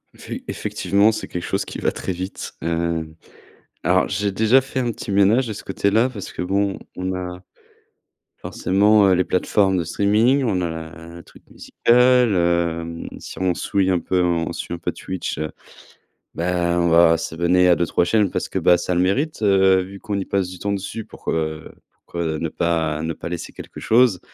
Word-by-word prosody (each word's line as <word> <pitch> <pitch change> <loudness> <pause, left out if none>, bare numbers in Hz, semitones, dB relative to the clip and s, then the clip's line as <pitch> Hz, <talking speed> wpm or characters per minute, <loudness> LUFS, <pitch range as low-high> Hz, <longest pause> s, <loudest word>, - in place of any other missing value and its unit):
Effe - - -13 0.2
effectivement, 100 +2 +1
c'est 110 - -5
quelque 90 - -5
chose - - -1
qui - - -7
va - - +1
très - - -4
vite. 95 +2 -6
Hem, 85 -1 -2 0.7
alors 95 +1 +2
j'ai 100 +1 -1
déjà 110 +6 +4
fait 135 0 -4
un 120 -2 0
petit 110 - -9
ménage 100 +6 +3
de 110 - -4
ce 100 - -9
côté-là 100 +5 +1
parce 105 -6 -8
que - - -5
bon, 100 +2 0 0.2
on 95 +1 -2
a 90 -1 -5 1.0
forcément, 100 +2 +3
heu, 95 - +4
les 90 0 +2
plateformes 95 +1 +1
de 85 - 0
streaming, 110 - +2
on 100 -7 0
a 85 - -1
la 80 0 -6
a 80 0 -12
la 85 - -12
truc - - -19
musicale, 125 -1 +3
hem. 85 -1 -1
Si - - -10
on 95 -1 +1
souille 95 +2 0
un 90 - +2
peu 90 +1 0
en 85 -2 0
on - - -4
suit - - -5
un 85 - -5
peu - - -2
Twitch, 95 -1 -5
heu, 75 0 -3 0.8
bah, 85 0 0
on 85 0 +2
va 85 0 +5
s'abonner 85 +3 +1
à 90 - +6
2-3 85 0 +1
chaînes 105 +2 +2
parce - - -3
que - - -2
bah 90 - +5
ça 90 - -2
le 90 - +2
mérite, 135 - 0
heu, 95 -2 +4
vu 95 +2 -9
qu'on 100 0 -3
y 95 - -3
passe 95 -2 -1
du 90 -1 -10
temps 100 - -2
dessus 100 +3 -5
pourquoi, - - -6
heu, 80 -1 -3 0.3
pourquoi, 85 - -5
heu, 80 -1 -1
ne 80 - -3
pas 80 -2 -1
ne 80 +1 -2
pas - - -8
laisser 85 -1 -6
quelque - - -10
chose 115 -4 +3
90 Hz, 205 wpm, -21 LUFS, 85-100 Hz, 1.0 s, à